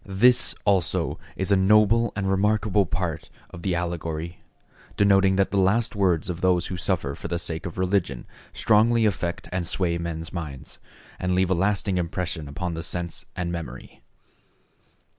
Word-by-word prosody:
This 120 +6 +3
also 95 -5 +1 0.2
is 95 +1 -1
a - - +6
noble 105 +4 +4
and 100 -2 -2
remarkable 105 0 +2
part 85 -4 -3 0.2
of 85 - -9
the 90 -1 0
allegory, 85 -1 -4 0.6
denoting 95 -1 +4
that 95 0 +1
the 100 - +2
last 105 +5 +2
words 90 -5 +1
of 90 -1 -4
those 90 -1 +2
who 95 - -4
suffer 85 -5 -1
for - - -7
the 85 - -2
sake 85 0 -3
of 85 - -9
religion 90 -8 0 0.3
strongly 115 +1 +3
affect 90 -4 -2
and 90 -2 -2
sway 85 -2 -1
men's 85 -1 -5
minds, 75 -6 -7 0.4
and 90 0 0
leave 95 0 +2
a - - +5
lasting 95 +1 +1
impression 85 -2 -3
upon 85 +5 -4
the 80 - -4
sense 85 +1 -3
and 85 -1 -2
memory. 85 -2 -7
90 Hz, 160 wpm, -25 LUFS, 85-100 Hz, 0.6 s, a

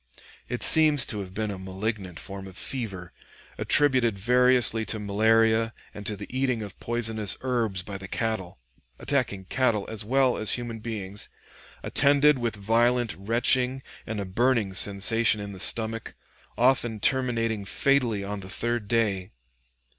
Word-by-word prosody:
It - - -3
seems 150 -4 +4
to 105 - -5
have 95 -2 -7
been 105 +2 -3
a 95 - -7
malignant 95 -1 -5
form 95 -1 -7
of 95 0 -13
fever 100 -9 -3 0.5
attributed 130 -7 +3
variously 125 +1 +3
to 110 - -1
malaria 110 +2 +2 0.2
and 105 -1 -5
to 105 - -2
the 100 - -7
eating 130 -4 0
of 100 - -10
poisonous 110 -3 0
herbs 115 -8 -2
by 100 +1 -7
the 95 - -8
cattle 95 -5 -3 0.4
attacking 120 -9 -2
cattle 115 -2 0
as 110 -1 -4
well 130 +3 +2
as 110 - +2
human 120 -2 -4
beings, 105 -3 -6 0.5
attended 145 0 +3
with 115 -2 -2
violent 115 +3 +1
retching 125 +5 +1 0.2
and 110 -1 -4
a 100 - -3
burning 110 0 0
sensation 105 +3 +3
in 100 0 -6
the 95 - -10
stomach, 115 +3 0 0.4
often 120 -3 +1
terminating 115 -4 0
fatally 120 -2 0
on 100 +1 -5
the 95 -1 -10
third 120 0 -2
day. 105 -5 0
110 Hz, 145 wpm, -26 LUFS, 100-120 Hz, 0.5 s, seems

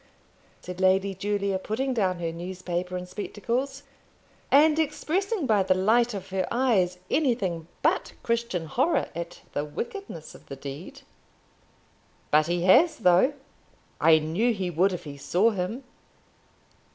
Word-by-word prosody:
said 180 +1 -7
Lady 190 +1 +3
Julia, 200 0 -1
putting 255 +7 -2
down 190 -6 +1
her 170 -1 -3
newspaper 180 +1 -4
and 180 0 -6
spectacles, 235 +8 -3 0.7
and 305 +2 +5
expressing 340 +5 -1
by 215 -5 +3
the 185 0 +2
light 225 +4 +2
of 190 -1 -7
her 190 -1 -1
eyes 215 -8 +2
anything 200 - 0 0.2
but - - +1
Christian 230 -7 -1
horror 260 - +1
at 170 +1 -7
the 145 - -1
wickedness 165 - -7
of - - -16
the 140 - -7
deed. 140 +5 -9 1.3
"But 155 +1 +4
he 175 0 0
has, 270 - +5
though. 185 +7 +4 0.7
I 160 0 +6
knew 175 +10 0
he 185 -3 -2
would 180 +4 +3
if 180 - -5
he 145 -2 -8
saw 180 +10 +2
him." 205 +6 -3
190 Hz, 140 wpm, -26 LUFS, 175-240 Hz, 1.3 s, I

